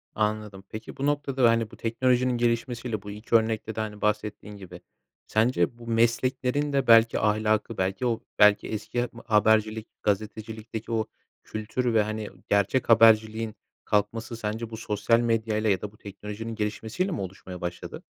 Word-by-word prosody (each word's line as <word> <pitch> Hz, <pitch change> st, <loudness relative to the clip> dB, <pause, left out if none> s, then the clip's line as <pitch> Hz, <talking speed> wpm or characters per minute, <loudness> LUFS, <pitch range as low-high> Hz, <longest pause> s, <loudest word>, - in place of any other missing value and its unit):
Anladım. 105 Hz, -2 st, -2 dB
Peki, 110 Hz, +1 st, -8 dB
bu 135 Hz, -, -2 dB
noktada, 140 Hz, -4 st, +2 dB
hani, 115 Hz, -1 st, +1 dB
bu -, -, -13 dB
teknolojinin 125 Hz, +2 st, +1 dB
gelişmesiyle, 120 Hz, -1 st, -1 dB
bu 100 Hz, +1 st, -8 dB
2 105 Hz, +3 st, -2 dB
örnekte 110 Hz, -1 st, +1 dB
de, -, -, -4 dB
hani, 105 Hz, -1 st, -4 dB
bahsettiğin 105 Hz, -1 st, -2 dB
gibi 90 Hz, -3 st, -11 dB, 0.5 s
sence 110 Hz, -2 st, +1 dB
bu 120 Hz, -1 st, -12 dB
mesleklerin 125 Hz, +5 st, +1 dB
de 135 Hz, -1 st, +1 dB
belki 115 Hz, 0 st, +6 dB
ahlakı, 110 Hz, +1 st, +1 dB
belki 95 Hz, +5 st, -1 dB
o 115 Hz, -2 st, 0 dB, 0.2 s
belki 105 Hz, -1 st, +6 dB
eski 120 Hz, +3 st, -2 dB
mı 115 Hz, -, -13 dB
habercilik, 110 Hz, +1 st, +2 dB, 0.2 s
gazetecilikteki 110 Hz, +2 st, -3 dB
o 110 Hz, -1 st, 0 dB, 0.4 s
kültür 115 Hz, +3 st, -2 dB
ve, 110 Hz, -1 st, +4 dB
hani, 110 Hz, 0 st, -4 dB, 0.2 s
gerçek 100 Hz, +6 st, +2 dB
haberciliğin 110 Hz, -1 st, +5 dB, 0.3 s
kalkması 110 Hz, +3 st, -1 dB
sence 110 Hz, +1 st, -4 dB
bu 110 Hz, -, -7 dB
sosyal 115 Hz, +1 st, +1 dB
medyayla 110 Hz, -2 st, +1 dB
ya 95 Hz, -2 st, +2 dB
da 105 Hz, -, -5 dB
bu 105 Hz, -, -21 dB
teknolojinin 105 Hz, +3 st, -7 dB
gelişmesiyle 110 Hz, -, -2 dB
mi 135 Hz, -, -3 dB
oluşmaya 95 Hz, -1 st, -8 dB
başladı? 90 Hz, 0 st, -6 dB
110 Hz, 155 wpm, -26 LUFS, 105-115 Hz, 0.5 s, belki